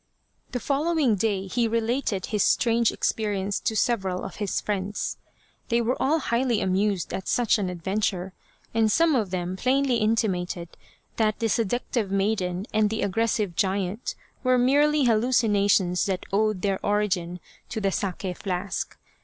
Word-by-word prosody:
The 250 Hz, -, -2 dB
following 290 Hz, 0 st, +1 dB
day 200 Hz, -1 st, 0 dB
he 230 Hz, +5 st, 0 dB
related 230 Hz, -3 st, -1 dB
his 210 Hz, -2 st, -1 dB
strange 230 Hz, +1 st, +3 dB
experience 205 Hz, -2 st, -1 dB
to 220 Hz, -, -1 dB
several 195 Hz, -5 st, 0 dB
of -, -, -7 dB
his 205 Hz, -3 st, -1 dB
friends. 205 Hz, 0 st, -3 dB, 0.5 s
They 235 Hz, 0 st, +3 dB
were 235 Hz, +2 st, +1 dB
all 300 Hz, +4 st, +3 dB
highly 235 Hz, -5 st, 0 dB
amused 190 Hz, 0 st, 0 dB
at 190 Hz, -, -4 dB
such 235 Hz, -3 st, +2 dB
an 190 Hz, -3 st, -1 dB
adventure, 190 Hz, +1 st, -2 dB, 0.4 s
and 225 Hz, -1 st, +3 dB
some 330 Hz, +5 st, +4 dB
of 220 Hz, -7 st, +1 dB
them 180 Hz, 0 st, -3 dB
plainly 260 Hz, +3 st, +2 dB
inti 220 Hz, +1 st, +2 dB
mated 180 Hz, -2 st, -3 dB, 0.5 s
that 215 Hz, -2 st, +2 dB
the 225 Hz, -, 0 dB
seductive 230 Hz, 0 st, 0 dB
maiden 195 Hz, -2 st, 0 dB
and 215 Hz, -1 st, +3 dB
the 220 Hz, +1 st, -2 dB
aggressive 210 Hz, -2 st, 0 dB
giant 195 Hz, +3 st, -1 dB, 0.3 s
were 255 Hz, -1 st, +4 dB
merely 290 Hz, +4 st, +3 dB
hallucinations 210 Hz, -6 st, +2 dB
that 190 Hz, -2 st, -2 dB
owed 215 Hz, -2 st, +1 dB
their 195 Hz, -2 st, 0 dB
origin 190 Hz, -4 st, 0 dB, 0.3 s
to -, -, -3 dB
the 200 Hz, -2 st, 0 dB
sake 185 Hz, -1 st, -3 dB
flask. 190 Hz, 0 st, -3 dB
210 Hz, 150 wpm, -25 LUFS, 190-235 Hz, 0.5 s, some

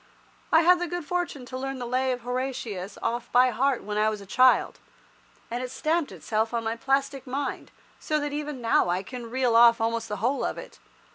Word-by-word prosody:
I 325 Hz, -, +6 dB
had 355 Hz, +1 st, +5 dB
the 355 Hz, -, -2 dB
good 350 Hz, -1 st, -4 dB
fortune 345 Hz, -6 st, -3 dB
to 255 Hz, +1 st, -6 dB
learn 270 Hz, 0 st, -4 dB
the 245 Hz, -, -5 dB
Lay 255 Hz, +2 st, 0 dB
of 250 Hz, -1 st, -3 dB
Horatius 245 Hz, -6 st, -4 dB
off 240 Hz, +1 st, -2 dB
by 250 Hz, +1 st, +5 dB
heart 260 Hz, +3 st, 0 dB
when 210 Hz, 0 st, -2 dB
I 215 Hz, +1 st, +3 dB
was 215 Hz, -1 st, -4 dB
a 200 Hz, -, -11 dB
child, 255 Hz, +6 st, +3 dB, 0.7 s
and 240 Hz, +1 st, -2 dB
it 255 Hz, -, -4 dB
stamped 315 Hz, +4 st, -1 dB
itself 225 Hz, +1 st, -2 dB
on 230 Hz, -, -1 dB
my 225 Hz, 0 st, -2 dB
plastic 275 Hz, +2 st, -1 dB
mind, 275 Hz, +2 st, -3 dB, 0.3 s
so 305 Hz, -1 st, -1 dB
that 290 Hz, -1 st, -3 dB
even 295 Hz, -3 st, -4 dB
now 225 Hz, -6 st, +2 dB
I 180 Hz, +2 st, 0 dB
can 240 Hz, +2 st, -8 dB
reel 250 Hz, -1 st, +1 dB
off 230 Hz, 0 st, +7 dB
almost 230 Hz, 0 st, -1 dB
the 210 Hz, -, -3 dB
whole 250 Hz, +7 st, 0 dB
of -, -, -2 dB
it. -, -, -10 dB
250 Hz, 215 wpm, -26 LUFS, 230-275 Hz, 0.7 s, off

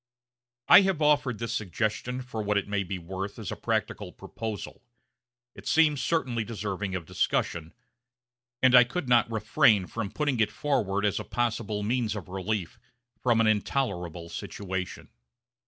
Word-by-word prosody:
I -, -, +10 dB
have 190 Hz, -4 st, +1 dB
offered 145 Hz, -5 st, +2 dB
this 115 Hz, +1 st, -3 dB
suggestion 110 Hz, +6 st, -2 dB
for 120 Hz, -3 st, -5 dB
what 105 Hz, 0 st, +1 dB
it 100 Hz, -, -1 dB
may 100 Hz, 0 st, 0 dB
be 95 Hz, 0 st, -4 dB
worth 95 Hz, +3 st, -6 dB
as 110 Hz, -4 st, -5 dB
a -, -, -3 dB
practical -, -, -2 dB
proposal; 110 Hz, -3 st, -7 dB, 0.7 s
it -, -, -11 dB
seems 150 Hz, -4 st, +3 dB
certainly 125 Hz, -7 st, 0 dB
deserving 105 Hz, -3 st, -4 dB
of 90 Hz, -3 st, -4 dB
discussion, 80 Hz, +1 st, -1 dB, 0.9 s
and 130 Hz, -1 st, +6 dB
I 125 Hz, -1 st, +10 dB
could 130 Hz, +5 st, -4 dB
not 120 Hz, -2 st, +4 dB
refrain 105 Hz, -2 st, +3 dB
from 110 Hz, +1 st, -4 dB
putting 145 Hz, 0 st, -1 dB
it 110 Hz, -1 st, +2 dB
forward 105 Hz, -10 st, 0 dB
as 105 Hz, -, +1 dB
a -, -, -4 dB
possible 110 Hz, -3 st, -2 dB
means 115 Hz, 0 st, 0 dB
of 100 Hz, -4 st, -7 dB
relief 95 Hz, -1 st, -3 dB, 0.4 s
from 120 Hz, -3 st, +3 dB
an -, -, +3 dB
intolerable 100 Hz, -, -1 dB
situation. 95 Hz, +1 st, -5 dB
110 Hz, 155 wpm, -28 LUFS, 95-125 Hz, 0.9 s, I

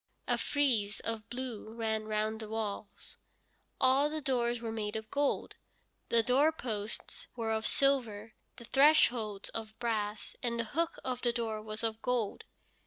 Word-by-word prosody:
A -, -, +3 dB
frieze 235 Hz, -8 st, +1 dB
of 225 Hz, -1 st, -4 dB
blue 240 Hz, -3 st, -4 dB
ran 220 Hz, -1 st, -1 dB
round 215 Hz, 0 st, -1 dB
the 220 Hz, -1 st, -6 dB
walls. 215 Hz, -2 st, -5 dB, 0.6 s
All 265 Hz, +3 st, +5 dB
the 310 Hz, +1 st, -3 dB
doors 240 Hz, -4 st, +1 dB
were 230 Hz, -1 st, -4 dB
made 215 Hz, -1 st, -3 dB
of 220 Hz, 0 st, -5 dB
gold, 285 Hz, 0 st, 0 dB, 0.5 s
the 230 Hz, -1 st, +4 dB
doorposts 250 Hz, -5 st, 0 dB
were 225 Hz, -2 st, -1 dB
of 220 Hz, 0 st, +1 dB
silver, 230 Hz, -6 st, +1 dB, 0.2 s
the 235 Hz, -, -11 dB
thresholds 240 Hz, -7 st, +4 dB
of 220 Hz, -1 st, -6 dB
brass, 215 Hz, -3 st, -2 dB
and 235 Hz, -1 st, -1 dB
the -, -, +2 dB
hook 325 Hz, +9 st, -1 dB
of 250 Hz, -1 st, -2 dB
the 240 Hz, -, +3 dB
door 225 Hz, -2 st, -2 dB
was 215 Hz, +1 st, -5 dB
of 225 Hz, -1 st, -1 dB
gold. 245 Hz, -5 st, -1 dB
225 Hz, 155 wpm, -32 LUFS, 215-250 Hz, 0.6 s, All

